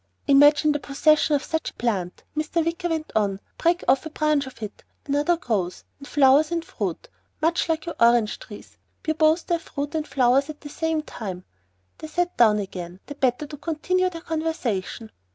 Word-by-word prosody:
"Imagine 290 Hz, +2 st, +6 dB
the 295 Hz, -, -1 dB
possession 300 Hz, +2 st, +3 dB
of 285 Hz, -, -1 dB
such 320 Hz, -1 st, -2 dB
a -, -, -18 dB
plant!" 190 Hz, -7 st, -2 dB
Mr. 310 Hz, +2 st, 0 dB
Wicker 335 Hz, +1 st, -2 dB
went 320 Hz, -1 st, -3 dB
on. 200 Hz, -3 st, +1 dB, 0.2 s
"Break 345 Hz, +1 st, +2 dB
off 270 Hz, -, +4 dB
a 315 Hz, -, -6 dB
branch 305 Hz, -2 st, +1 dB
of 260 Hz, -, -12 dB
it 210 Hz, -, -8 dB, 0.2 s
another 290 Hz, +5 st, +1 dB
grows. 200 Hz, -, -2 dB, 0.2 s
And 280 Hz, -, -11 dB
flowers 290 Hz, +1 st, +5 dB
and 335 Hz, -1 st, -1 dB
fruit -, -, -4 dB, 0.3 s
much 330 Hz, +2 st, +1 dB
like 320 Hz, -1 st, 0 dB
your 340 Hz, -, -4 dB
orange 235 Hz, -2 st, +4 dB
trees -, -, -12 dB, 0.2 s
bear 315 Hz, -, 0 dB
both 315 Hz, +2 st, +3 dB
their 340 Hz, -1 st, 0 dB
fruit 290 Hz, -2 st, -5 dB
and 310 Hz, -1 st, -2 dB
flowers 265 Hz, +2 st, +3 dB
at 300 Hz, -, -8 dB
the 290 Hz, -, -9 dB
same 320 Hz, +1 st, -1 dB
time." 190 Hz, -10 st, -7 dB, 0.6 s
They 315 Hz, -, -7 dB
sat 350 Hz, +2 st, -1 dB
down 220 Hz, -3 st, +5 dB
again, 180 Hz, -3 st, -6 dB
the 285 Hz, -, -7 dB
better 265 Hz, 0 st, 0 dB
to 295 Hz, 0 st, -9 dB
continue 360 Hz, +5 st, 0 dB
their 335 Hz, -2 st, -8 dB
conversation. 275 Hz, -, -3 dB
295 Hz, 190 wpm, -24 LUFS, 245-320 Hz, 0.6 s, Imagine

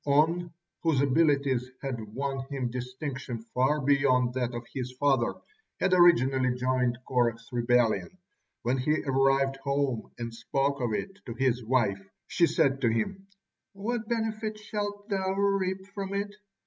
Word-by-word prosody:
On, 165 Hz, +4 st, +3 dB, 0.3 s
whose 160 Hz, -5 st, +2 dB
abilities 140 Hz, -3 st, +2 dB
had 135 Hz, -4 st, -4 dB, 0.2 s
won 135 Hz, 0 st, -2 dB
him 130 Hz, -4 st, -2 dB
distinction 125 Hz, 0 st, -5 dB, 0.2 s
far 135 Hz, +4 st, +2 dB
beyond 130 Hz, -3 st, +3 dB
that 125 Hz, -1 st, -1 dB
of 120 Hz, 0 st, -5 dB
his 125 Hz, -1 st, -3 dB
father, 135 Hz, -2 st, +2 dB, 0.4 s
had 190 Hz, -, +2 dB
originally 130 Hz, -8 st, +5 dB
joined 125 Hz, -1 st, +1 dB
Korah's 120 Hz, -2 st, 0 dB
rebellion. 120 Hz, +6 st, +1 dB, 0.5 s
When 125 Hz, +2 st, +1 dB
he 150 Hz, +4 st, +1 dB
arrived 135 Hz, 0 st, +2 dB
home 140 Hz, -3 st, -1 dB
and 115 Hz, -1 st, -5 dB
spoke 135 Hz, +4 st, -1 dB
of 120 Hz, -2 st, 0 dB
it 195 Hz, -, -4 dB
to 115 Hz, -, -5 dB
his 125 Hz, -1 st, +1 dB
wife, 110 Hz, -5 st, +1 dB, 0.2 s
she 170 Hz, -, +3 dB
said 135 Hz, -5 st, +2 dB
to 120 Hz, -, +3 dB
him: 190 Hz, -, -2 dB, 0.5 s
"What 220 Hz, +3 st, -3 dB
benefit 220 Hz, -2 st, -2 dB
shalt 205 Hz, -1 st, -4 dB
thou 190 Hz, -2 st, 0 dB
reap 195 Hz, -1 st, 0 dB
from 200 Hz, -1 st, -4 dB
it? 205 Hz, +1 st, -2 dB
135 Hz, 145 wpm, -28 LUFS, 125-175 Hz, 0.5 s, originally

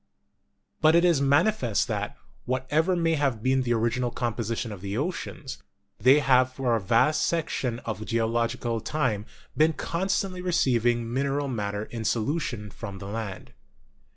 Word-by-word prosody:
But 155 Hz, +1 st, +6 dB
it 170 Hz, +1 st, +5 dB
is 170 Hz, -6 st, +3 dB
manifest 140 Hz, -, +2 dB
that, -, -, -3 dB, 0.3 s
whatever 145 Hz, +8 st, +1 dB
may 165 Hz, -1 st, +1 dB
have 135 Hz, -8 st, 0 dB
been 130 Hz, 0 st, +3 dB
the 120 Hz, -2 st, +1 dB
original 120 Hz, +2 st, 0 dB
composition 115 Hz, -1 st, -3 dB
of 100 Hz, -3 st, -8 dB
the 100 Hz, +2 st, -3 dB
oceans, 150 Hz, -2 st, -4 dB, 0.4 s
they 130 Hz, +6 st, +6 dB
have 130 Hz, -1 st, +4 dB
for 130 Hz, -2 st, 0 dB
a 110 Hz, -, -1 dB
vast 115 Hz, +10 st, +3 dB
section 150 Hz, -7 st, -1 dB
of 110 Hz, -1 st, -4 dB
geological 115 Hz, +1 st, 0 dB
time 115 Hz, -6 st, -1 dB, 0.3 s
been 155 Hz, +1 st, +4 dB
constantly 185 Hz, +3 st, -2 dB
receiving 120 Hz, -9 st, +1 dB
min 135 Hz, +2 st, +1 dB
eral 140 Hz, -1 st, -1 dB
matter 105 Hz, -2 st, -2 dB
in 115 Hz, -1 st, -6 dB
solution 115 Hz, -2 st, -1 dB
from 100 Hz, -4 st, -7 dB
the 100 Hz, -, -8 dB
land. 105 Hz, -1 st, -6 dB
125 Hz, 150 wpm, -26 LUFS, 115-150 Hz, 0.4 s, But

